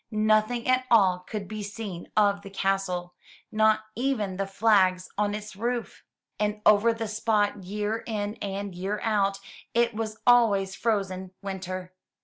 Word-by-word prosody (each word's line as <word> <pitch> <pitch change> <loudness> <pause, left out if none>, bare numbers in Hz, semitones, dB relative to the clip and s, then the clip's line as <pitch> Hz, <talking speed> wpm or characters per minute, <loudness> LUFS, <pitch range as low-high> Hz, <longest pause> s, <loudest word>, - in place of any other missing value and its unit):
Nothing 215 +2 +2
at 255 0 +2
all 190 -6 +5
could 195 +2 -6
be 215 +1 -5
seen 205 -3 -7
of 200 -1 +3
the 200 - -10
castle, 195 -2 -1 0.4
not 215 0 +3
even 220 -7 -1
the 195 0 -1
flags 195 -3 +3
on 205 0 0
its 210 -1 -7
roof. 235 +3 -3 0.4
And 210 0 0
over 215 +2 +6
the 225 -1 -3
spot, 210 -2 0
year 210 +3 -2
in 210 -2 -2
and 200 -1 -4
year 195 +4 -3
out, 200 -3 +1 0.4
it 235 0 +3
was 215 0 -4
always 210 -6 +4
frozen 190 -4 -2
winter. 185 -1 -5
205 Hz, 145 wpm, -27 LUFS, 195-220 Hz, 0.4 s, over